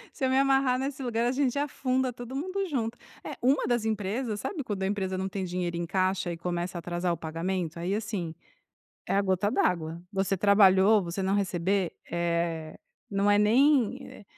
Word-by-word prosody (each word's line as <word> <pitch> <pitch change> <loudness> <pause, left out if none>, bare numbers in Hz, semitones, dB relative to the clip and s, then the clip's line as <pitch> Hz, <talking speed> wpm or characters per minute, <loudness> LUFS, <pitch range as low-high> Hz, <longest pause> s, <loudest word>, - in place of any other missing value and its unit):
Se 265 - -1
eu - - +2
me 260 - +2
amarrar 270 -2 +3
nesse 270 +1 -3
lugar 235 -1 0
a 245 - +2
gente 265 0 0
afunda 260 -2 0
todo 245 +2 -8
mundo 375 +7 -2
junto. 245 -7 -2 0.3
É, - - -6
uma 265 +4 +3
das 240 -2 +1
empresas 215 +1 -2
sabe 315 - -4
quando 205 -5 -3
a - - +1
empresa 190 -2 -2
não 190 +1 -2
tem 195 0 -4
dinheiro 175 -1 -2
em 170 - -2
caixa 185 0 0
e 170 - -5
começa 175 +1 -3
a - - -3
atrasar 175 +1 -1
o - - -4
pagamento? 165 +1 -3
Aí, 175 +3 -1
assim, 205 -6 -3 0.7
é - - 0
a 200 - +3
gota 190 +1 +1
d'água, 170 -6 0
você 195 0 0
trabalhou, 200 +1 +5
você 175 +2 -4
não 190 +1 +1
receber? 190 -1 0 0.2
Eh, 170 -2 -1 0.3
não 200 0 +2
é 205 - +5
nem 250 +2 +4
é - - -13
200 Hz, 195 wpm, -28 LUFS, 180-245 Hz, 0.7 s, trabalhou